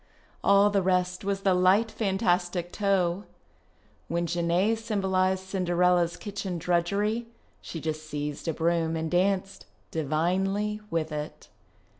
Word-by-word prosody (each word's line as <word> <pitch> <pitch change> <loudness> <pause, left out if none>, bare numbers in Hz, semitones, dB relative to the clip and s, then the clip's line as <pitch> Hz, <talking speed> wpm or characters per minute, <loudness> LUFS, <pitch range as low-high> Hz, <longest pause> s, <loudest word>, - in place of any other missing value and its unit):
All 200 +1 +5
the 200 -1 +2
rest 180 0 0
was 195 0 -1
the 195 -1 +3
light 190 +5 +3
fantastic 180 -4 0
toe. 195 -2 0 0.8
When 170 +1 -1
Genee 175 +5 +1
symbolized 190 -4 0
Cinderella's 180 -2 +1
kitchen 200 -3 -4
drudgerj', 200 +7 0 0.4
she 165 - -7
just 155 0 -4
seized 150 +1 -4
a 165 - +1
broom 165 -1 +1
and 160 0 -3
danced, 195 +1 0 0.2
di\'inely, 190 +7 0
with 165 -1 -1
it. 150 0 -6
180 Hz, 120 wpm, -27 LUFS, 170-195 Hz, 0.8 s, All